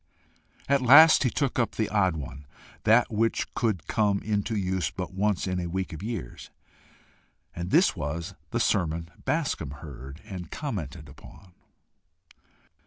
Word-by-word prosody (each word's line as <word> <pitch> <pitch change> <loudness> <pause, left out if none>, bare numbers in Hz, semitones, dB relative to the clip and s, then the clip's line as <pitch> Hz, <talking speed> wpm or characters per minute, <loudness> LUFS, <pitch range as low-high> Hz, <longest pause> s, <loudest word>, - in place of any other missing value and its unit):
At 140 -1 +3
last 145 +6 +8
he 130 - +3
took 135 0 -1
up 120 - 0
the 110 - 0
odd 95 -5 +1
one 70 -1 -8 0.4
that 115 +3 +4
which 115 +1 0
could 105 -10 -1
come 105 -2 +1
into 105 +1 -1
use 95 -5 -1
but - - -6
once 100 0 0
in 90 -1 -1
a 85 - -3
week 95 +1 -3
of 80 - -8
years 110 - -6 1.1
and 85 +1 -4
this 170 - +4
was 85 +4 -4 0.2
the 120 - -1
sermon 85 -6 0
Bascombe 110 - -1
heard 70 -1 -9
and 95 -5 -7
commented - - -5
upon. 95 -2 -15
95 Hz, 145 wpm, -27 LUFS, 85-115 Hz, 1.1 s, last